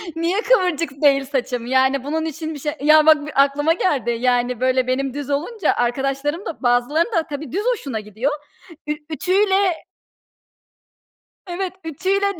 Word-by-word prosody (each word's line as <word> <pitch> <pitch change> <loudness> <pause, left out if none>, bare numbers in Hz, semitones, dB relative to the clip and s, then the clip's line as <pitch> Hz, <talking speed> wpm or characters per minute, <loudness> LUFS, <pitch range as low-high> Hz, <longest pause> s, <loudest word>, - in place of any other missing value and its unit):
niye 340 +5 0
kıvırcık 360 - +2
değil 275 -2 +4
saçım? 255 -3 -3
Yani, 265 +1 +2
bunun 315 +3 -2
için 315 0 -5
bir 290 - -8
şey 295 +1 -3
Ya, 305 +1 +6
bak, 305 -2 +5
bir 300 - -6
aklıma 290 +3 +1
geldi. 285 -10 0
Yani, 245 -1 +1
böyle 255 0 +2
benim 265 0 -1
düz 285 0 -6
olunca, 355 +10 0
arkadaşlarım 275 - -1
da, 315 - -7
bazılarının 250 - +1
da 330 -4 +2
tabii 290 -2 -6
düz 395 +5 -2
hoşuna 270 - -5
gidiyor. 215 +7 -3 0.6
Ü - - -1 0.2
ütüyle 380 +2 +1 1.6
Evet, 365 +1 -4
ütüyle 385 +4 -1
290 Hz, 150 wpm, -20 LUFS, 265-335 Hz, 1.6 s, Ya